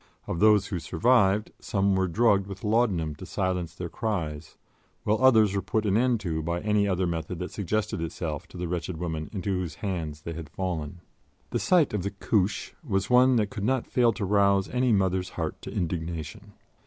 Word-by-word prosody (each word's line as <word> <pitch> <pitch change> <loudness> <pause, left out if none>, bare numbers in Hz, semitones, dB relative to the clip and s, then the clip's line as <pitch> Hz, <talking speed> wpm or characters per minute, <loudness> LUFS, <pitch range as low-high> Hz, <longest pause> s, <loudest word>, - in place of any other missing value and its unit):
Of 85 - -3
those 105 -1 +5
who 95 -3 -3
survived, 105 +3 +2
some 100 -1 +1
were 95 0 +1
drugged 100 +1 +3
with 100 -1 -8
laudanum 105 -8 +1
to 90 - -8
silence 90 -3 -2
their 90 -1 -5
cries, 80 -7 -4 0.5
while 110 +4 +1
others 110 -6 +6
were 100 - +1
put 110 +3 -1
an 100 -1 +2
end 120 0 +3
to 80 -5 -2
by 85 +2 -2
any 105 -1 +2
other 95 -1 +1
method 85 0 -3
that 90 - -5
suggested 105 -1 -2
itself 80 -2 -4
to - - -12
the 90 0 -3
wretched 85 0 -3
women 80 -2 -4
into 100 -2 -3
whose 85 -6 -4
hands 80 -6 -4
they 85 - -5
had 80 -2 -7
fallen. 85 -3 -4 0.5
The - - 0
sight 170 -9 +3
of 105 - 0
the 100 - -2
"Couche" 100 0 -1
was 95 -6 -1
one 125 +1 +6
that 105 -3 +1
could 100 - -5
not 130 +2 +1
fail 120 -2 +3
to 105 - -3
rouse 100 -1 +3
any 125 0 +1
mother's 95 -3 +1
heart - - -3
to - - -7
indignation. 85 +4 -4
95 Hz, 195 wpm, -27 LUFS, 85-105 Hz, 0.5 s, others